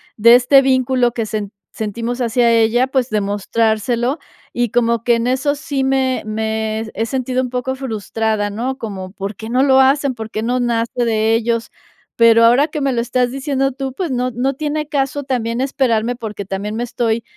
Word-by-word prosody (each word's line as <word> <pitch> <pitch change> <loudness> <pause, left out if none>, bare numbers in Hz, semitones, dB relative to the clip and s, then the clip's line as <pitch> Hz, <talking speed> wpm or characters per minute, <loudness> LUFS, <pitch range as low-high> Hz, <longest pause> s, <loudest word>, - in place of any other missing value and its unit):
de 235 +2 +7
este 255 +3 +5
vínculo 260 -2 +2
que 230 -1 -3
sen 210 -2 -4 0.2
sentimos 230 +3 -4
hacia 235 0 +2
ella", 230 +3 +3
pues, 260 -2 0
demostrárselo, 220 +5 0 0.4
y 240 -1 0
como 235 0 +1
que 240 -1 +3
en 230 +1 -1
eso 265 +3 +1
sí 280 -2 -3
me 265 -1 +1
me 220 0 -2
he 225 - -1
sentido 255 +1 -1
un 250 - -4
poco 255 +1 -3
frustrada, 220 -4 -2
¿no?, 245 +6 -3
como: 195 -6 -6
"¿Por 195 0 -6
qué 220 +1 -8
no 250 +2 +2
lo 265 -1 +5
hacen? 275 0 +2
¿Por 220 -1 -7
qué 215 - -3
no 245 +3 0
nace 235 0 -1
de 225 0 +2
ellos?". 230 0 -1 0.5
Pero 230 0 +6
ahora 250 +6 +5
que 300 - -4
me 275 -2 0
lo 235 - 0
estás 245 +1 0
diciendo 270 0 -1
tú, 270 0 -4
pues, 345 +3 -3
no 250 0 -1
no 250 +4 -1
tiene 300 +2 -3
caso 285 -1 -1
también 240 -3 -2
esperarme 245 -4 0
porque 210 -4 -6
también 200 +2 -4
me 240 - -1
estoy 230 -1 -1
240 Hz, 190 wpm, -18 LUFS, 220-260 Hz, 0.5 s, de